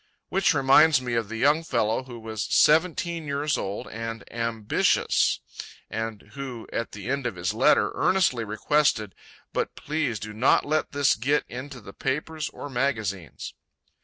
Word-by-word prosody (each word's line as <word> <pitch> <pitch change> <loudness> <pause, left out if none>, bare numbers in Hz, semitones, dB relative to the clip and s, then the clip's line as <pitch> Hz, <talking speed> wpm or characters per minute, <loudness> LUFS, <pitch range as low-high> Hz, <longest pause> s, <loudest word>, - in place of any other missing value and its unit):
Which 190 -4 +2
reminds 140 +2 +6
me 125 -2 -4
of 115 -3 -1
the 115 - -5
young 145 +7 +3
fellow 120 -4 0
who 120 -2 -9
was 110 -1 -4
"seventeen 170 +1 +2
years 145 +1 0
old 100 +1 -4
and 115 0 -5
ambicious," 115 -2 +1 0.5
and 110 -2 -5
who, 130 -5 -7
at 115 - -3
the 105 +1 -8
end 135 -1 -1
of 115 - -4
his 90 0 -2
letter, - - +4
earnestly 175 -11 +2
requested 110 -1 +1 0.4
"but - - -2
please 150 -7 -2
do 110 +1 -7
not 115 +5 +3
let 155 +1 0
this 140 -1 +3
git 140 +6 +1
into 130 +1 -7
the 100 -3 -12
papers 150 +3 -3
or - - -8
magazines." 110 - -3
125 Hz, 155 wpm, -26 LUFS, 110-145 Hz, 0.5 s, reminds